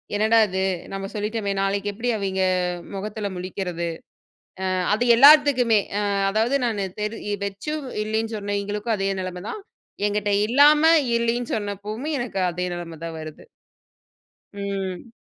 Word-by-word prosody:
என்னடா 220 Hz, +2 st, +4 dB
இது 190 Hz, 0 st, -2 dB, 0.3 s
நம்ம 195 Hz, 0 st, -4 dB
சொல்லிட்டமே. 210 Hz, 0 st, -2 dB
நாளைக்கு 200 Hz, +1 st, -1 dB
எப்டி 240 Hz, +4 st, -3 dB
அவிங்க 190 Hz, -2 st, -2 dB, 0.5 s
மொகத்துல 210 Hz, +1 st, -4 dB
முழிக்கிறது. 180 Hz, -2 st, -4 dB, 0.8 s
அ -, -, 0 dB, 0.2 s
அது 230 Hz, +3 st, +1 dB
எல்லாத்துக்குமே 275 Hz, -5 st, +7 dB, 0.5 s
அதாவது 225 Hz, +6 st, +1 dB
நானு 210 Hz, -4 st, -1 dB, 0.2 s
தெறி 210 Hz, -1 st, -3 dB
வச்சும் 270 Hz, +10 st, -4 dB, 0.2 s
இல்லைன்னு 220 Hz, +1 st, -2 dB
சொன்னவைங்களுக்கும் 205 Hz, +2 st, -2 dB
அதே 195 Hz, 0 st, 0 dB
நெலம 180 Hz, 0 st, -6 dB
தான். 430 Hz, -, -6 dB, 0.5 s
என்கிட்ட 205 Hz, 0 st, -1 dB, 0.2 s
இல்லாம 290 Hz, +5 st, +6 dB, 0.3 s
இல்லைன்னு 235 Hz, +1 st, -1 dB
சொன்னப்பவுமே 210 Hz, +7 st, -4 dB
எனக்கு 240 Hz, -5 st, -3 dB
அதே 180 Hz, +1 st, -3 dB
நெலம 165 Hz, -2 st, -7 dB
தான் 165 Hz, -1 st, -6 dB
வருது. 155 Hz, -1 st, -9 dB, 1.1 s
ம். 200 Hz, +1 st, -4 dB
205 Hz, 120 wpm, -23 LUFS, 195-230 Hz, 1.1 s, எல்லாத்துக்குமே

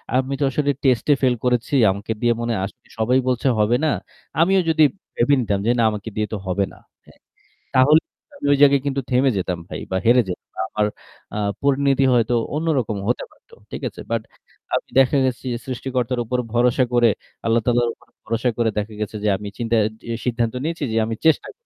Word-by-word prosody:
আমি 130 Hz, +1 st, +1 dB
তো -, -, +1 dB
আসলে 145 Hz, +1 st, +1 dB
টেস্টে 130 Hz, +1 st, +3 dB
ফেল 130 Hz, -2 st, +3 dB
করেছি, 125 Hz, +1 st, 0 dB, 0.2 s
আমাকে 100 Hz, +3 st, -5 dB
দিয়ে 120 Hz, -1 st, +3 dB
মনে 120 Hz, 0 st, -1 dB
হয় 95 Hz, -, -1 dB
আসলে 100 Hz, -, -13 dB
সবাই 125 Hz, +4 st, +3 dB
বলছে 125 Hz, +1 st, +1 dB
হবে 105 Hz, +3 st, +3 dB
না। 155 Hz, -, +3 dB, 0.5 s
আমিও 190 Hz, +3 st, +4 dB
যদি 160 Hz, -1 st, +4 dB, 0.3 s
ভেবে 120 Hz, +4 st, +3 dB
নিতাম 100 Hz, -4 st, 0 dB
যে, -, -, +5 dB
"না -, -, +4 dB
আমাকে 105 Hz, +1 st, -5 dB
দিয়ে 105 Hz, 0 st, -1 dB
তো 110 Hz, -, -1 dB
হবে 95 Hz, +2 st, +1 dB
না।" -, -, -16 dB, 0.3 s
হ্যাঁ? -, -, -20 dB, 0.6 s
তাহলে 150 Hz, +5 st, +6 dB, 0.3 s
আমি 280 Hz, -, -8 dB
ওই -, -, +2 dB
জায়গায় 140 Hz, -2 st, +6 dB
কিন্তু 140 Hz, -1 st, -1 dB
থেমে 130 Hz, +2 st, +3 dB
যেতাম 90 Hz, -2 st, -2 dB
ভাই -, -, -6 dB
বা 95 Hz, -, +1 dB
হেরে 120 Hz, +2 st, +6 dB
যেতাম। 90 Hz, -, -7 dB, 0.2 s
আমার, 105 Hz, -, 0 dB, 0.5 s
আ -, -, -2 dB, 0.2 s
পরিণতি 140 Hz, -1 st, +2 dB
হয়তো 120 Hz, -1 st, +2 dB, 0.2 s
অন্যরকম 145 Hz, -9 st, 0 dB
হতে 120 Hz, -, 0 dB
পারতো। -, -, -26 dB, 0.2 s
ঠিক -, -, -6 dB
আছে? -, -, -11 dB
বাট 115 Hz, -1 st, +1 dB, 0.5 s
আমি -, -, -1 dB
দেখা 135 Hz, +2 st, +4 dB
গেছে 130 Hz, 0 st, -3 dB, 0.2 s
সৃষ্টিকর্তার 125 Hz, -1 st, -2 dB
উপর 125 Hz, +3 st, -1 dB, 0.2 s
ভরসা 125 Hz, +2 st, +3 dB
করে, 120 Hz, -1 st, +5 dB, 0.4 s
আল্লাহ 115 Hz, 0 st, +3 dB
তাআলার 120 Hz, -1 st, +2 dB
উপর -, -, -25 dB, 0.2 s
ভরসা 115 Hz, +2 st, 0 dB
করে 115 Hz, -1 st, +2 dB
দেখা 105 Hz, +1 st, -2 dB
গেছে 105 Hz, +1 st, -4 dB
যে -, -, +1 dB
আমি 105 Hz, -, -7 dB
চিন্তা 115 Hz, -1 st, 0 dB, 0.3 s
যে -, -, -1 dB
সিদ্ধান্ত 115 Hz, -2 st, 0 dB
নিয়েছি 165 Hz, 0 st, -3 dB
যে -, -, 0 dB
আমি 115 Hz, 0 st, -3 dB
চেষ্টা 160 Hz, -2 st, +3 dB
করব। -, -, -10 dB
120 Hz, 200 wpm, -21 LUFS, 115-135 Hz, 0.6 s, তাহলে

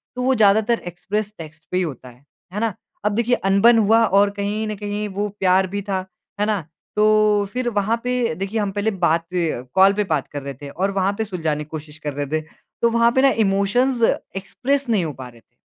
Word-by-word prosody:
तो 250 Hz, -, -3 dB
वो 260 Hz, +1 st, +3 dB
ज़्यादातर 220 Hz, +2 st, +3 dB
एक्सप्रेस 205 Hz, +4 st, -3 dB
टेक्स्ट 160 Hz, -1 st, -11 dB
पे 180 Hz, -, 0 dB
ही 185 Hz, -, +2 dB
होता 135 Hz, -6 st, -6 dB
है। 125 Hz, +3 st, -20 dB, 0.3 s
है 205 Hz, -, -2 dB
ना? 225 Hz, -2 st, 0 dB, 0.3 s
अब 210 Hz, -, +3 dB
देखिए 235 Hz, +2 st, +2 dB
अनबन 225 Hz, +5 st, +5 dB
हुआ 225 Hz, +1 st, +4 dB
और 200 Hz, 0 st, +4 dB
कहीं 210 Hz, +2 st, -2 dB
न 215 Hz, -, -3 dB
कहीं 205 Hz, +1 st, -4 dB
वो 205 Hz, +2 st, -2 dB
प्यार 190 Hz, 0 st, +3 dB
भी 200 Hz, +2 st, -4 dB
था। 190 Hz, -2 st, -3 dB, 0.3 s
है 210 Hz, -, +2 dB
ना? 210 Hz, -3 st, 0 dB, 0.3 s
तो 215 Hz, -1 st, +4 dB
फिर 250 Hz, -1 st, -1 dB
वहाँ 215 Hz, +1 st, 0 dB
पे 250 Hz, -5 st, 0 dB
देखिए 195 Hz, +5 st, -3 dB
हम 205 Hz, -2 st, -1 dB
पहले 205 Hz, +2 st, -1 dB
बात 170 Hz, -4 st, +1 dB, 0.5 s
कॉल 195 Hz, +1 st, +6 dB
पे 210 Hz, +1 st, 0 dB
बात 150 Hz, -4 st, 0 dB
कर 145 Hz, -, -6 dB
रहे 140 Hz, 0 st, -6 dB
थे 145 Hz, -, -7 dB
और 190 Hz, +7 st, -1 dB
वहाँ 195 Hz, 0 st, +1 dB
पे 220 Hz, -, 0 dB
सुलझाने 160 Hz, -6 st, -2 dB
की -, -, -15 dB
कोशिश 155 Hz, -1 st, -8 dB
कर 150 Hz, -1 st, -4 dB
रहे 145 Hz, +1 st, -3 dB
थे। 155 Hz, +3 st, -1 dB, 0.4 s
तो 235 Hz, -, +4 dB
वहाँ 235 Hz, 0 st, +3 dB
पे 260 Hz, -, +4 dB
ना 275 Hz, -, +6 dB, 0.2 s
इमोशंस 205 Hz, +6 st, +1 dB, 0.4 s
एक्सप्रेस 265 Hz, +8 st, -1 dB
नहीं 205 Hz, -7 st, +2 dB
हो 155 Hz, -, -4 dB
पा 130 Hz, -1 st, -9 dB
रहे 120 Hz, -1 st, -15 dB
थे। -, -, -49 dB
200 Hz, 225 wpm, -21 LUFS, 175-220 Hz, 0.5 s, कॉल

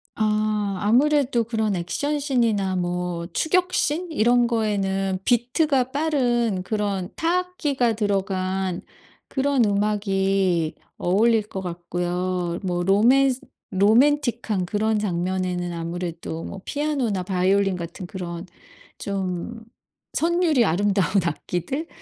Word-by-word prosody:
아. 215 Hz, 0 st, +1 dB, 0.2 s
아무래도 255 Hz, +2 st, +3 dB
그런 220 Hz, -3 st, 0 dB
액션 285 Hz, +13 st, -2 dB
신이나 230 Hz, -9 st, +1 dB
뭐 175 Hz, -1 st, -2 dB
추격 360 Hz, -, +1 dB
신 330 Hz, +4 st, 0 dB
이런 240 Hz, -3 st, +3 dB
거에는 195 Hz, -4 st, 0 dB
비트가 250 Hz, +3 st, +2 dB
빠른 245 Hz, -9 st, +1 dB
그런 200 Hz, -3 st, -2 dB
타악기가 325 Hz, -8 st, 0 dB
들어간 190 Hz, -3 st, -1 dB, 0.5 s
그런 275 Hz, -2 st, +2 dB
음악이 195 Hz, -4 st, +1 dB, 0.2 s
어울릴 220 Hz, +5 st, +3 dB
것 195 Hz, -2 st, -6 dB
같고요. 175 Hz, 0 st, -2 dB
뭐 175 Hz, -2 st, -1 dB
로맨스 250 Hz, +7 st, +4 dB, 0.3 s
로맨틱한 225 Hz, -1 st, +2 dB
그런 215 Hz, +3 st, 0 dB
장면에는 180 Hz, -2 st, -1 dB
아무래도 170 Hz, -1 st, -5 dB
뭐 195 Hz, -, -7 dB
피아노나 275 Hz, -10 st, -1 dB
바이올린 190 Hz, +1 st, +2 dB
같은 170 Hz, +2 st, -7 dB
그런 175 Hz, -2 st, -6 dB, 0.5 s
좀 195 Hz, +3 st, -4 dB, 0.5 s
선율이 335 Hz, -5 st, +2 dB
아름다운 195 Hz, +2 st, +1 dB, 0.2 s
악기들? 180 Hz, -, -3 dB
205 Hz, 245 characters per minute, -23 LUFS, 185-245 Hz, 0.5 s, 로맨스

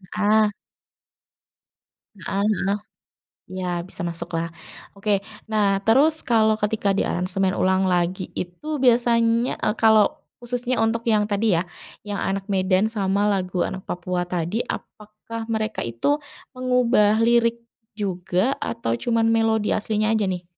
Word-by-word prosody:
heeh. 215 Hz, 0 st, +3 dB, 1.7 s
Heeh, 195 Hz, +2 st, -2 dB, 0.2 s
noh 200 Hz, +1 st, 0 dB, 0.7 s
ya 180 Hz, -2 st, -3 dB
bisa 185 Hz, -, -6 dB
masuklah. 170 Hz, 0 st, -3 dB, 0.5 s
Oke, 200 Hz, -1 st, 0 dB, 0.3 s
nah 205 Hz, -3 st, +2 dB
terus 295 Hz, +8 st, +4 dB
kalau 220 Hz, -2 st, +3 dB
ketika 210 Hz, -1 st, 0 dB
diaransemen 185 Hz, +1 st, 0 dB
ulang 190 Hz, +1 st, +2 dB
lagi 180 Hz, +1 st, -1 dB
itu 275 Hz, -, -4 dB
biasanya, 235 Hz, -1 st, +3 dB
eee, 210 Hz, -, 0 dB
kalau 220 Hz, -2 st, +4 dB, 0.2 s
khususnya 245 Hz, +1 st, -2 dB
untuk 230 Hz, +1 st, -1 dB
yang 215 Hz, -2 st, +3 dB
tadi 205 Hz, +1 st, +1 dB
ya, 170 Hz, -, 0 dB, 0.4 s
yang 205 Hz, -1 st, -3 dB
Anak 195 Hz, 0 st, -2 dB
Medan 190 Hz, +1 st, +2 dB
sama 200 Hz, -2 st, 0 dB
lagu 185 Hz, -3 st, -1 dB
Anak 190 Hz, 0 st, -5 dB
Papua 180 Hz, 0 st, -2 dB
tadi 175 Hz, +5 st, -2 dB
apakah 215 Hz, +2 st, -7 dB
mereka 220 Hz, 0 st, -2 dB
itu 115 Hz, -, 0 dB, 0.4 s
mengubah 250 Hz, -4 st, +3 dB
lirik 235 Hz, 0 st, +3 dB, 0.4 s
juga 185 Hz, +3 st, 0 dB
atau 230 Hz, -, -2 dB
cuman 230 Hz, -, 0 dB
melodi 225 Hz, -1 st, +2 dB
aslinya 215 Hz, +1 st, 0 dB
aja 215 Hz, -, +1 dB
nih? 180 Hz, -1 st, -3 dB
210 Hz, 125 wpm, -23 LUFS, 185-230 Hz, 1.7 s, terus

